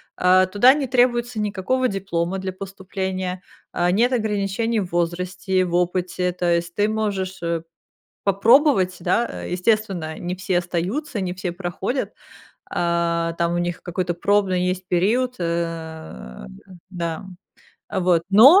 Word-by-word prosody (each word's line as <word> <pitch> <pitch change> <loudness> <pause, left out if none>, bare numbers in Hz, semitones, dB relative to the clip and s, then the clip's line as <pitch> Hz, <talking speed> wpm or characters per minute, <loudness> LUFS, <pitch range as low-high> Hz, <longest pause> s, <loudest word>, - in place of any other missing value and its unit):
А, 185 +1 +5
туда 225 +7 +6
не 285 -3 -2
требуется 240 -2 +2
никакого 210 +5 0
диплома 190 -2 -2
для 190 0 -3
поступления, 190 -1 -4 0.3
а, 175 0 +1
нет 235 +7 +3
ограничений 220 0 0
в 185 -3 -4
возрасте 180 +2 -1
и - - +4
в 175 -1 -2
опыте, 180 0 0
то 175 -1 +1
есть 170 0 -2
ты 205 +1 +2
можешь, 200 -3 -2
э, 170 -1 -1 0.6
попробовать, 200 -1 +4
да. 235 +7 +1 0.2
Э, - - -6
естественно, 180 -4 0
не 180 +1 -3
все 185 -1 0
остаются, 195 - -3
не 180 -1 -2
все 185 -1 -4
проходят, 185 +8 -3 0.6
а, 170 -1 0
там 170 0 0
у 175 - 0
них 175 0 -2
какой-то 175 0 -2
пробный 190 0 +2
есть 185 0 -2
период. 235 +8 +2
Э, 160 - -4 0.4
да, 170 -1 -4 0.6
а 190 - -2
вот. 175 -2 +3
Но 270 - +9
185 Hz, 140 wpm, -22 LUFS, 175-205 Hz, 0.6 s, Но